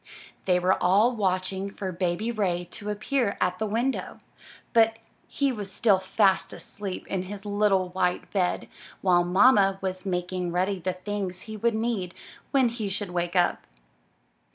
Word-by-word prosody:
They 180 -1 +3
were 185 +1 +2
all 210 +7 +4
watching 190 -1 -1
for 195 -1 -5
Baby 180 +5 -1
Ray 180 -6 -1
to 210 -1 -6
appear 215 +1 -1
at 180 0 0
the 220 - -1
window, 235 +6 -1 0.6
but 225 -1 +4 0.3
he 280 -1 0
was 205 -5 -6
still 200 -1 +3
fast 190 +1 +2
asleep 200 -3 -6
in 190 - -2
his 200 +2 -8
little 205 -3 +2
white 180 -1 -1
bed, 185 -3 0 0.3
while 175 -2 +4
mamma 195 +1 +5
was 185 -1 -4
making 180 -1 -2
ready 185 +2 0
the 185 +1 -2
things 185 -1 -4
he 220 -1 -8
would 230 +2 +1
need 220 -5 -2 0.3
when 265 -3 +3
he 225 -3 -4
should 195 -1 -3
wake 175 0 -2
up. 175 -1 +1
195 Hz, 155 wpm, -26 LUFS, 180-215 Hz, 0.6 s, mamma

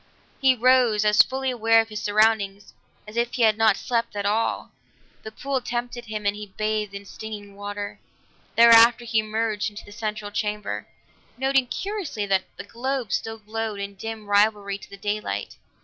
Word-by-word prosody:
He 265 -1 +5
rose 245 -3 +4
as 210 0 +7
fully 265 0 -1
aware 225 -2 +4
of 225 0 0
his 215 -1 -5
surroundings 205 -2 +1 0.3
as 215 +2 -9
if 235 +1 0
he 245 - +1
had 220 -1 +5
not 220 -2 +4
slept 235 -3 -2
at 200 0 -2
all; 215 +3 0 0.5
the 220 - -8
pool 270 +3 -2
tempted 240 0 -4
him 215 -2 -5
and 205 0 +1
he 210 -1 -9
bathed 215 -1 -1
in 200 0 -8
stinging 205 -1 -8
water. 205 0 -6 0.6
Thereafter 230 0 +7
he 225 -1 +1
emerged 215 0 -1
into 205 0 -11
the - - -13
central 210 -1 -4
chamber, 210 0 -3 0.5
noting 265 0 +2
curiously 385 - -3
that 195 -1 +1
the - - -6
globes 245 +1 -3
still 225 0 -4
glowed 215 -1 -4
in 200 0 -5
dim 220 +2 -7
rivalry 205 -1 +2
to - - -13
the 200 - -11
daylight. 205 - -3
215 Hz, 175 wpm, -24 LUFS, 205-235 Hz, 0.6 s, as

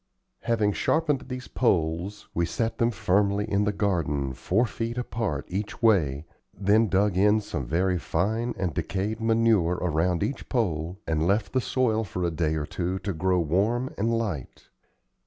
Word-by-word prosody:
Having 110 -3 +1
sharpened 150 -1 +1
these 130 -1 -6
poles 90 -2 0
we 85 - +1
set 115 +4 -2
them 115 -1 +3
firmly 100 -1 +1
in 105 -1 +1
the 105 - +2
garden, 80 -10 -1
four 105 - +1
feet 115 +1 -4
apart 110 - -2
each 100 +3 -4
way, 80 -10 +3 0.3
then 105 +3 +3
dug 100 -1 +2
in 105 +3 +4
some 70 - -5
very 90 +4 +1
fine 110 +10 -1
and 95 -4 -1
decayed 105 - -2
manure 110 -6 +3
around 90 +1 +1
each 115 +7 -4
pole, 90 - -1
and 80 0 0
left 100 +1 +1
the 130 - +2
soil 115 -3 +1
for 90 -2 -4
a 85 - +1
day 80 -1 0
or 75 -2 -2
two 90 +4 -2
to 100 +1 -3
grow 90 +3 +1
warm 105 - 0
and 110 +3 0
light. 95 - -5
100 Hz, 165 wpm, -26 LUFS, 85-115 Hz, 0.3 s, in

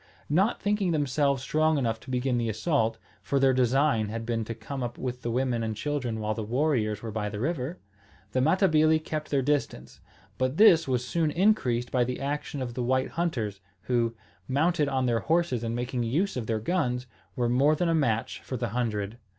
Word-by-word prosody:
Not 190 +9 +2
thinking 205 -2 0
themselves 140 -3 +1
strong 155 +1 +2
enough 115 -4 -1
to 130 - -14
begin 125 -1 0
the 115 -1 -1
assault, 110 -1 0 0.2
for 140 - 0
their 135 -1 +4
design 125 -3 +2
had 115 +1 -4
been 115 -1 -1
to 115 - -5
come 135 +3 -6
up 120 -1 -4
with 125 -1 -4
the 120 - -3
women 125 0 0
and 110 -1 -2
children 125 -2 -2
while 110 0 -1
the 110 - -4
warriors 115 -3 0
were 115 - -4
by 105 -1 -2
the 105 0 -6
river, 150 +4 -2 0.5
the 130 - +1
Matabili 160 0 +4
kept 155 -1 -5
their 140 -2 +1
distance. 135 - -2 0.4
But 130 +3 0
this 170 -7 +6
was 125 -2 0
soon 165 0 +1
increased 145 - +1
by 125 -2 +3
the 125 +1 -3
action 140 0 -3
of 120 -2 -5
the 125 - -3
white 130 +2 +1
hunters, 115 - -2 0.2
who, 115 -2 0 0.3
mounted 150 +2 +1
on 130 -2 0
their 120 -2 +2
horses 160 -7 0
and 115 0 -2
making 125 +1 -2
use 155 - 0
of 120 -4 -4
their 115 - 0
guns, 125 -2 -1 0.3
were 120 -1 +1
more 135 +6 +3
than 175 +3 0
a 165 - +2
match 125 -6 0
for 130 - -5
the 120 -1 -2
hundred. 110 -1 -2
130 Hz, 200 wpm, -27 LUFS, 115-150 Hz, 0.5 s, this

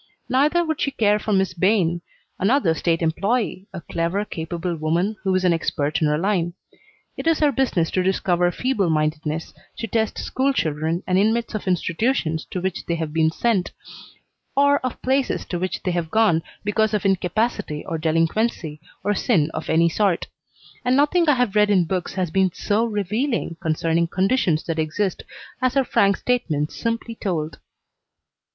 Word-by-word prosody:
Neither 300 +7 +3
would 315 -2 -2
she - - +2
care 210 -5 +2
for 215 - -3
Miss 190 -2 +2
Bayne, 175 -2 +2 0.4
another 200 - +3
state 165 +1 0
employee, 200 +4 0
a 180 - -7
clever, 170 +6 -2
capable 170 0 -4
woman 170 +7 0
who 190 -2 +1
is 185 - +1
an 175 - +4
expert 150 -2 -1
in 155 - +3
her 150 0 +1
line. 175 -1 0 0.6
It - - -4
is 330 -1 +4
her 295 -2 +3
business 245 -11 0
to 185 - +1
discover 180 -1 +1
feeble 215 -5 0
mindedness, 155 0 -1 0.2
to - - -3
test 220 0 -1
school 270 +2 0
children, 160 - -1
and 185 0 +2
inmates 225 +3 +1
of 215 -2 -4
institutions 170 - 0
to 185 - -3
which 185 0 -3
they 170 - 0
have 160 -2 -4
been 160 -1 +3
sent, 195 +2 0 0.8
or 285 0 +5
of 255 -1 -4
places 265 +1 0
to 175 - -2
which 185 +1 -3
they 180 - 0
have 170 -2 -2
gone 210 -5 +3 0.2
because 215 +1 +1
of 210 - -2
incapacity 195 -3 0
or 165 - -3
delinquency 165 0 0 0.2
or 205 +1 +1
sin 160 -5 +1
of - - -5
any 165 +1 +4
sort; 185 +1 +1 0.6
and 250 +1 +2
nothing 300 +4 +3
I 295 - +5
have 245 -5 +1
read 210 0 +4
in 185 -4 +4
books 180 +1 -3
has 185 -4 -1
been 190 0 +2
so 210 +4 0
revealing 215 -1 -1
concerning 165 +1 +1
conditions 185 -3 +1
that 165 -1 -3
exist 175 +5 -1 0.4
as 255 0 +1
her 275 - +4
frank 200 -5 +2
statements 160 -13 -1
simply 230 0 -3
told. 170 -8 -3
185 Hz, 170 wpm, -22 LUFS, 165-225 Hz, 0.8 s, or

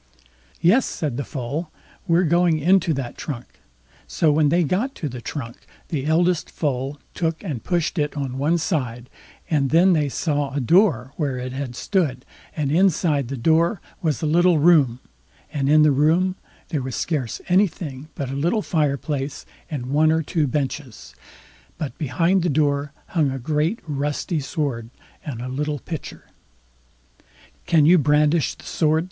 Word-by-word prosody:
"Yes", 215 +10 +4
said 145 -6 -3
the 140 - -2
Foal; 145 +5 -4 0.4
"we're 170 +1 +4
going 170 0 +3
into 175 +2 +3
that 130 -3 -5
trunk." 130 -6 -7 0.5
So 160 -3 +2
when 150 0 +3
they 170 +3 +3
got 205 - -1
to 155 - -4
the 125 -3 -7
trunk, 120 -2 -6 0.3
the 145 -3 -2
eldest 170 +1 +2
foal 140 -1 -2
took 165 0 -2
and 145 - -4
pushed 175 -1 -1
it 150 0 -1
on 135 -2 -3
one 155 +5 +2
side, 130 -7 -3 0.4
and 145 -4 +1
then 175 +5 +5
they 150 -3 +1
saw 145 -1 -1
a - - +1
door 140 - +3
where 140 -5 -1
it 125 0 -5
had 130 -2 -5
stood, 155 - -1 0.3
and 145 -3 0
inside 160 -5 +2
the 135 +2 -5
door 165 - +2 0.2
was 160 -2 -1
a - - +1
little 175 +2 +4
room, 145 -6 +4 0.5
and 140 -2 0
in 155 +1 +6
the 150 - +5
room 165 +7 +2 0.3
there 150 -5 -1
was 130 -1 -4
scarce 140 -9 -2
anything 165 -7 0
but 135 -2 -4
a - - -4
little 170 +10 0
fireplace 145 -3 -1 0.2
and 140 -6 -4
one 150 +4 +3
or 160 0 +1
two 155 -1 0
benches; 135 -2 -4 0.6
but 150 -7 -4
behind 165 +7 +1
the 175 - 0
door 145 -1 +1 0.2
hung 155 -6 +1
a 135 - -3
great 155 - 0
rusty 145 +2 -2
sword 135 -5 -3 0.3
and 125 -6 -5
a - - -4
little 145 +3 -2
pitcher. 160 +3 -7 1.4
"Can 160 -4 +4
you 175 +3 +6
brandish 150 +2 +2
the - - -16
sword?" 155 -1 +1
150 Hz, 165 wpm, -22 LUFS, 135-165 Hz, 1.4 s, in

